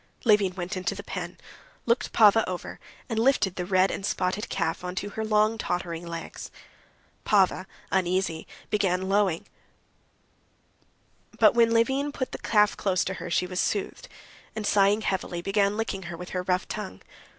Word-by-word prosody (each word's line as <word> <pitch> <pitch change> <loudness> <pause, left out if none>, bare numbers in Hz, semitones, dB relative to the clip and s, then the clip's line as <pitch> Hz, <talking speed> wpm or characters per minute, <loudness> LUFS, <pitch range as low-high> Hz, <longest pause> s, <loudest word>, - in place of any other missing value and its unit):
Levin 205 -5 +4
went 185 +2 -4
into 185 +2 -2
the 200 - -7
pen, 180 -3 -6 0.5
looked 235 +1 +1
Pava 220 0 +6
over, 180 -1 -6 0.3
and 225 -3 -2
lifted 230 -7 +2
the 180 -1 -4
red 185 0 +3
and - - -5
spotted 190 +2 -1
calf 165 +2 -2
onto 185 +3 -4
her 220 - -4
long, 215 +1 +2
tottering 175 -2 -3
legs. 165 -1 -7 0.7
Pava, 190 -2 +2 0.2
uneasy, 185 -3 0 0.2
began 190 -3 +1
lowing, 195 -4 +1 1.9
but - - +6
when 235 -1 +4
Levin 265 +5 +2
put 260 -3 -4
the - - -6
calf 210 -2 +3
close 185 -2 +1
to 190 - -2
her 175 - -5
she 180 - +1
was 180 0 -4
soothed, 200 +1 -2 0.5
and, 215 -1 -3
sighing 205 +1 +3
heavily, 185 -4 -2
began 200 +3 +1
licking 220 -3 -2
her 170 - -6
with 180 +1 -8
her 180 - -2
rough 180 0 0
tongue. 210 -3 -6
195 Hz, 160 wpm, -26 LUFS, 180-215 Hz, 1.9 s, Pava